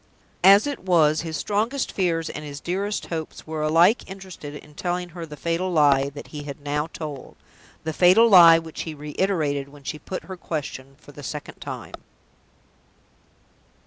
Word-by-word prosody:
As 200 +4 +8
it 285 -1 -3
was, 160 -4 +3
his 160 -1 -4
strongest 225 +6 -1
fears 165 -4 0
and 150 - -6
his 145 -1 -7
dearest 195 +6 -2
hopes 160 -1 -5
were 155 -1 -4
alike 165 +10 +3
interested 185 -6 -9
in 150 0 -12
telling 180 +3 -3
her 170 -1 -8
the 150 -1 -10
fatal 170 +4 -1
lie 140 -4 +4
that 145 0 -10
he 150 - -7
had 145 0 -8
now 145 +1 -2
told 150 -5 -8 0.5
the 160 - -3
fatal 185 +8 +6
lie 170 -6 +9
which 165 -1 -6
he 160 -2 -6
reiterated 150 -2 -1
when 145 0 -16
she 150 +3 -5
put 185 - -6
her 190 -1 -8
question 140 -5 -5
for 145 - -16
the 145 - -11
second 150 +2 -7
time. - - -7
160 Hz, 170 wpm, -24 LUFS, 150-185 Hz, 0.5 s, lie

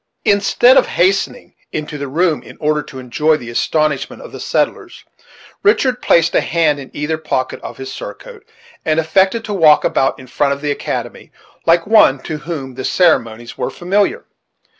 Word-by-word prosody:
Instead 205 +5 +4
of - - +4
hastening 195 +3 0 0.2
into 150 -1 -5
the 140 - -4
room 160 +3 0
in - - -14
order 150 -1 +1
to 145 -2 -11
enjoy 150 +5 +1
the 120 -5 -9
astonishment 155 +3 -1
of - - -11
the - - -9
settlers, - - -2 0.6
Richard 265 -12 +2
placed 165 0 +3
a - - +3
hand 160 -3 +1
in 135 - -9
either 155 +2 -3
pocket 130 -4 -3
of - - -8
his 135 0 -7
surcoat, 485 -4 -9 0.4
and 155 0 +1
affected 190 +8 +1
to 210 - -4
walk 160 -6 +5
about, 135 - +1
in 130 - -11
front 140 +2 0
of 140 - -8
the 145 -1 -1
academy, - - -5 0.4
like 165 0 +4
one 210 -11 +5
to 155 - -4
whom 150 -5 -6
the 130 +1 -7
ceremonies 120 -11 +1
were - - -1
familiar. 195 +3 -1
155 Hz, 175 wpm, -17 LUFS, 140-185 Hz, 0.6 s, walk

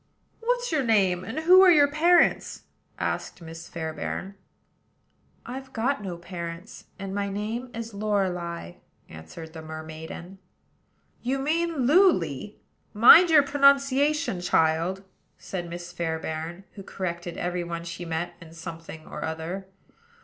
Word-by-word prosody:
"What's - - -1
your 310 -3 +2
name? 195 -6 +2
and 225 +10 -4
who 365 +3 +7
are 380 - +8
your 295 -4 +6
parents?" 335 +5 +3 0.3
asked - - -3
Miss 165 0 -10
Fairbairn. 165 +4 -5 1.1
"I've 265 +2 -8
got 245 +1 0
no 185 -4 -5
parents; 170 +2 -8
and 195 -1 -6
my 200 0 -1
name 220 +5 -4
is 230 -1 -6
Lorelei," 180 - -2 0.3
answered 120 - -10
the 160 - -8
mermaiden. 160 +4 -8 0.8
"You 260 +3 -1
mean 315 0 0
Luly; 210 - +3 0.4
mind 320 - +9
your 305 -3 +7
pronunciation, 280 - +3
child," 170 +2 +1 0.3
said 175 -3 -6
Miss 175 0 -7
Fairbairn, 165 +1 -4
who 200 - -10
corrected 175 -2 -5
every 175 0 -2
one 170 0 -5
she 170 +1 -7
met 165 +1 -3
in 165 -1 -13
something 165 -1 -9
or - - -7
other. 165 +4 -5
190 Hz, 130 wpm, -26 LUFS, 170-265 Hz, 1.1 s, mind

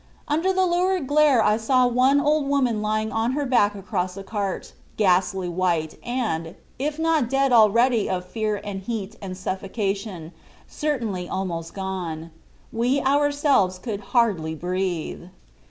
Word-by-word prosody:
Under 325 +6 +1
the 375 0 +2
lurid 360 -1 +1
glare 290 -4 +4
I 210 +1 +3
saw 250 +3 +3
one 255 +3 +3
old 295 0 +1
woman 255 -6 +1
lying 215 +1 -1
on 225 +3 0
her 290 +1 -1
back 210 -6 +3
across 185 -2 -3
a 195 - -6
cart, 200 -1 -4 0.2
ghastly 185 -2 +2
white 170 -3 -1
and, 215 -10 -2 0.2
if 295 +2 -2
not 320 -6 +1
dead 270 0 +2
already 230 +1 +4
of 180 -1 -2
fear 215 +1 -2
and 200 -2 -5
heat 215 0 -5
and 185 -2 -6
suffocation, 195 -2 -3 0.3
certainly 230 -12 -3
almost 170 -4 -4
gone. 175 -4 -4 0.4
We 245 +4 +1
ourselves 285 -8 +2
could 205 +2 -5 0.2
hardly 175 -9 +2
breathe." 180 0 -3
215 Hz, 140 wpm, -24 LUFS, 185-270 Hz, 0.4 s, glare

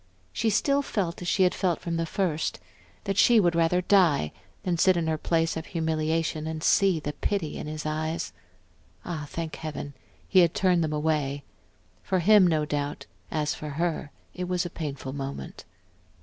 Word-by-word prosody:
She 225 - +1
still 280 +7 +2
felt 185 -11 -2
as 175 - -5
she 190 - +3
had 180 0 +3
felt 180 -3 0
from 170 -1 -3
the 165 0 -1
first, 160 -4 -1 0.4
that 195 -1 -1
she 235 -2 +6
would 175 -4 +3
rather 170 +2 +2
die 175 - +3 0.3
than 175 -2 -1
sit 185 0 +5
in 170 - 0
her 160 0 +1
place 165 0 +1
of 160 0 -5
humiliation 160 -1 -1
and 160 0 -4
see 195 -4 +4
the 150 -1 -4
pity 170 -1 -2
in - - -5
his 155 0 -5
eyes.... 155 - -2 0.7
Ah, 155 -4 -4
thank 165 -1 -5
Heaven, 150 -2 -6 0.3
he 190 - +5
had 170 -2 +4
turned 180 -3 +3
them 155 - -1
away; 150 -2 -1 0.6
for 190 - 0
him, 195 +1 +6
no 155 -3 +1
doubt, 145 0 -3 0.2
as 150 -1 -1
for 150 - -6
her 160 0 -2 0.2
it 180 - -4
was 180 0 -1
a 175 - -5
painful 140 -5 -5
moment. 135 - -6
165 Hz, 180 wpm, -27 LUFS, 155-180 Hz, 0.7 s, she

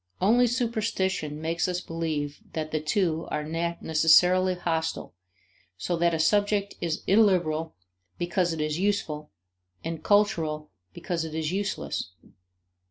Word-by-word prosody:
Only 240 +6 +4
superstition 215 - -1
makes 165 +2 -1
us 180 -1 -1
believe 155 -4 -3
that 155 -1 -3
the 155 - 0
two 165 +1 0
are 150 - -2
necessarily 170 +3 +3
hostile 165 - -2 0.6
so 95 - -1
that 170 0 +2
a - - -2
subject 205 +4 +2
is 165 -2 -2
illiberal 175 -6 +2 0.4
because 175 0 0
it 160 -1 -3
is 155 +2 -1
useful 175 -7 -1 0.5
and 165 -1 -5
cultural 165 -8 +1 0.2
because 170 - -3
it 160 -1 -6
is 160 0 -1
useless. 195 - -3
165 Hz, 125 wpm, -27 LUFS, 155-190 Hz, 0.6 s, Only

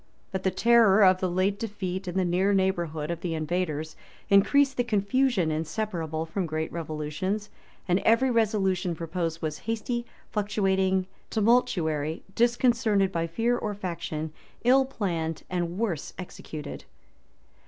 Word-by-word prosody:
[*] - - -38
But 190 -2 -2
the 190 - +2
terror 215 +1 +5
of 185 -1 +6
the 185 - 0
late 185 +3 +1
defeat, 190 -3 -4
and 180 +1 -3
the 185 - +2
near 185 +3 +2
neighborhood 170 -5 0
of 170 -1 -4
the 170 -2 -2
invaders, 155 -1 -2 0.4
increased 275 +8 +5
the 245 - +3
confusion 215 -4 +1
inseparable 160 0 -2
from 175 +2 -3
great 155 0 -3
revolutions; 165 +6 -3 0.4
and 180 +1 +3
every 230 +5 +3
resolution 195 -6 +1
proposed 165 0 -3
was 155 -1 -2
hasty, 235 +2 -2 0.2
fluctuating, 190 -3 +1 0.2
tumultuary; 170 -9 +1
disconcerted 235 -4 +2
by 165 -2 -1
fear 230 +8 +1
or 210 -3 -3
faction; 160 -5 -4 0.3
ill 265 +2 +5
planned, 170 - -3
and 175 -1 -2
worse 195 -10 -2
executed. 155 -4 -8
190 Hz, 135 wpm, -27 LUFS, 165-215 Hz, 0.4 s, of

